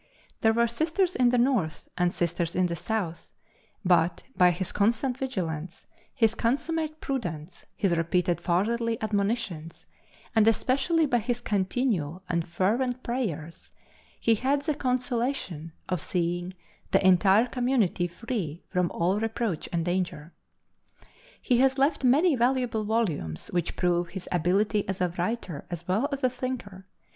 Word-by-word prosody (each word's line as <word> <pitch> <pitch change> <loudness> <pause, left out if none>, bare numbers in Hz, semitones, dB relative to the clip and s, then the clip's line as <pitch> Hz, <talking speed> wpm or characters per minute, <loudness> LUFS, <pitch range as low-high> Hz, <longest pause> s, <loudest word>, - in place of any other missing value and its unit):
There 220 - +4
were 235 +1 +3
Sisters 330 - 0
in 250 -1 +4
the 250 - +2
North 235 - +1
and 180 0 +2
Sisters 170 -1 -1
in 185 0 +3
the 170 -1 -1
South, 175 -4 -3 0.6
but, 175 -1 +3
by 180 -1 +6
his 175 +1 -2
constant 235 +5 +1
vigilance, 180 - -4 0.3
his 225 -4 +2
consummate 310 +7 -1
prudence, 175 - -4
his 185 -4 +1
repeated 175 +1 +1
fatherly 225 +6 +1
admonitions, 200 -6 -2 0.5
and 220 -1 +5
especially 270 - +2
by 245 -4 +2
his 240 +2 -2
continual 190 - -1
and 170 -2 0
fervent 235 +9 0
prayers, 185 - -4 0.5
he 230 - +3
had 275 +6 +1
the 305 0 0
consolation 250 - -2 0.2
of 180 -4 -1
seeing 175 +2 -2 0.3
the 195 0 +2
entire 190 +5 +5
Community 245 -8 +1
free 175 - -4
from 180 -2 +1
all 180 +4 0
reproach 225 -5 -2
and 170 -1 -1
danger. 175 -3 -2 1.1
He 245 -1 +2
has 265 +1 +3
left 280 +1 +2
many 290 +6 +4
valuable 245 -3 +1
volumes 170 - -1
which 175 -2 -1
prove 175 -1 +1
his 180 +1 -7
ability 195 +4 +1
as 190 - -2
a 180 -1 +1
writer 180 -5 -3
as 175 -1 -6
well 215 +10 +1
as 275 -1 -4
a 255 - +4
thinker. 240 -7 -5
205 Hz, 140 wpm, -27 LUFS, 175-250 Hz, 1.1 s, by